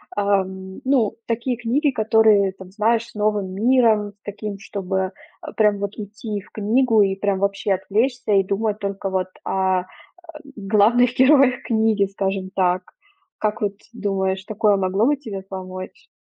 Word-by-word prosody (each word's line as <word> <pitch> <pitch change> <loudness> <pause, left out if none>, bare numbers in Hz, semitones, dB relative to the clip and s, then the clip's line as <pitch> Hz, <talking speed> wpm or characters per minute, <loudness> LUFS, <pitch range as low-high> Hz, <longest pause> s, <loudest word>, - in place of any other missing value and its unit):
ам. 190 -2 -1
Ну, 255 -6 +2
такие 235 +1 -2
книги, 260 +6 +1
которые 215 -3 +3
там 190 -1 -12
знаешь 225 +3 +1
с 235 - -18
новым 210 -2 0
миром 220 -2 +3
таким, 205 -1 -6
чтобы, 190 -3 -3 0.3
а, - - -9
прям 210 -2 +2
вот 200 +1 -4
идти 210 0 -6
и - - -4
в 185 - -21
книгу 220 +1 +2
и 195 -1 +2
прям 195 -1 -1
вообще 200 0 0
отвлечься 220 +4 0
и 195 - +4
думать 205 +2 -1
только 200 -1 -3
вот 185 -1 -1 0.2
о, 190 -1 +1
э, - - -13 0.7
главных 220 +4 +3
героях 260 -1 +5
книги, 220 -3 +2
скажем 195 -1 -2
так. 180 -1 +1 0.5
Как 215 0 -2
вот 205 -1 -1 0.2
думаешь, 190 -3 -1
такое 210 0 +2
могло 195 +3 +1
бы 295 - +3
тебе 220 -9 -7
помочь? 185 -1 -8
205 Hz, 155 wpm, -21 LUFS, 195-225 Hz, 0.7 s, героях